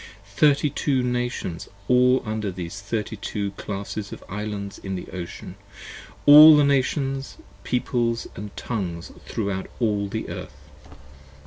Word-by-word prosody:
Thirty 145 +2 +3
two 135 -3 0
Nations, 125 -8 -3 0.2
And 125 +1 +4
under 110 -2 -2
these 90 +2 -7
Thirty 110 +1 -3
two 100 0 -3
Classes 100 +1 -6
of - - -9
Islands 105 -1 -5
in 95 -1 -5
the 90 - -6
Ocean, 90 -2 -7 0.7
All 150 +1 +10
the 150 - +5
Nations 135 0 0 0.3
Peoples 120 -2 -1 0.2
& 105 - -11
Tongues 90 -8 -4 0.2
throughout 100 -3 -3
all 105 -4 0
the 110 +2 -4
Earth. - - -8
110 Hz, 125 wpm, -24 LUFS, 100-125 Hz, 0.7 s, All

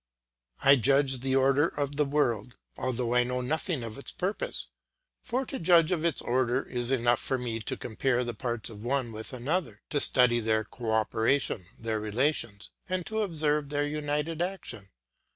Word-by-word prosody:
I 140 +1 +8
judge 135 +2 +3
of 130 - -1
the 135 0 0
order 135 +3 +4
of 145 -3 -3
the 150 0 +2
world, 125 -5 0 0.2
although 125 -2 -1
I 125 0 +4
know 125 +1 -2
nothing 155 +1 -2
of 115 +2 -7
its - - -4
purpose, 195 +3 -2 0.6
for 255 +3 -2
to 270 - -5
judge 170 0 +5
of 175 -3 +1
this 165 -3 0
order 125 +1 0
it - - -12
is 120 0 +1
enough 120 -2 +2
for 130 - 0
me 120 -3 -3
to 110 - -4
compare 125 +2 0
the 120 -1 -4
parts 120 +1 -1
one 120 +3 -2
with 110 +4 -6
another, 130 - -2
to 145 - +1
study 125 -4 +5
their 110 -1 +1
co 115 +1 -7
operation, 110 0 +1
their 110 -1 -2
relations, 110 -1 -1 0.2
and 185 -2 -1
to 220 0 -2
observe 150 -6 0
their 145 0 0
united 150 +2 -2
action. 150 - -4
130 Hz, 180 wpm, -28 LUFS, 120-150 Hz, 0.6 s, I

